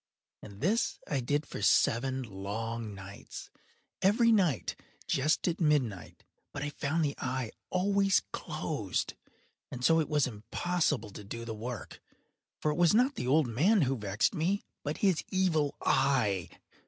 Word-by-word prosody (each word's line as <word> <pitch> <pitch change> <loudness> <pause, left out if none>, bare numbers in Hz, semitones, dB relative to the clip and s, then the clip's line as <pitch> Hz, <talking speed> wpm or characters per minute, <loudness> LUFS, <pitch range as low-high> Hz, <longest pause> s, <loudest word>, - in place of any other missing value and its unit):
And 100 0 -11
this 210 +9 +1
I 140 - 0
did 145 +4 0
for - - -7
seven 130 +3 +3
long 110 +1 -5
nights—every 190 - -2
night 180 - +2 0.3
just 155 +7 +1
at 175 +1 -1
midnight—but 140 - -2
I 145 - -3
found 155 +3 0
the 140 - -1
eye 125 -2 -2 0.2
always 195 +1 +2
closed; - - -3 0.6
and 125 0 -3
so 165 +2 +5
it 155 - -1
was 150 -2 +3
impossible 125 - -1
to 105 - -9
do 115 +4 -6
the 115 - -4
work; 115 +2 -7 0.6
for 150 - +1
it 150 - -3
was 175 +2 +5
not 255 +5 +4
the 125 - -4
old 150 +3 +4
man 165 - +3
who 135 0 +1
vexed 105 - 0
me, 190 +4 0 0.2
but 150 +1 -3
his 185 -5 +3
Evil 165 -6 +1
Eye. 125 -10 +2
140 Hz, 145 wpm, -31 LUFS, 115-175 Hz, 0.6 s, so